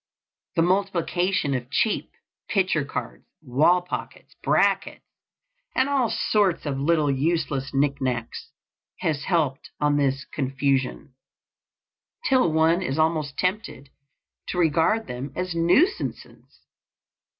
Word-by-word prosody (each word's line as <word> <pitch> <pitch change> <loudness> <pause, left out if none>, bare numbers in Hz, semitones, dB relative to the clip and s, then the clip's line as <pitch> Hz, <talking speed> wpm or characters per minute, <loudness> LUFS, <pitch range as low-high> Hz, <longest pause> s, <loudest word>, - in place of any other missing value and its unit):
The 165 - +3
multiplication 185 -3 0
of 125 -1 -3
cheap 215 - 0 0.4
picture 185 -6 +1
cards, 60 - -6 0.2
wall 155 +8 +3
pockets, 180 - -7
brackets, - - +1 0.7
and 260 - +3
all 270 -5 +1
sorts 200 -7 +1
of 140 -2 -2
little 150 0 +2
useless 140 -1 -1
knicknacks, 135 -4 -1 0.5
has 155 -6 -1
helped 155 -7 0
on 145 0 +2
this 135 -1 0
confusion, 135 0 -1 1.1
till 255 -11 +3
one 160 +3 +3
is 140 -6 -2
almost 155 -3 0
tempted 185 -8 -2 0.6
to - - -4
regard 170 +7 +2
them 130 -1 -6
as 180 -1 -2
nuisances. 180 - 0
160 Hz, 105 wpm, -24 LUFS, 135-180 Hz, 1.1 s, The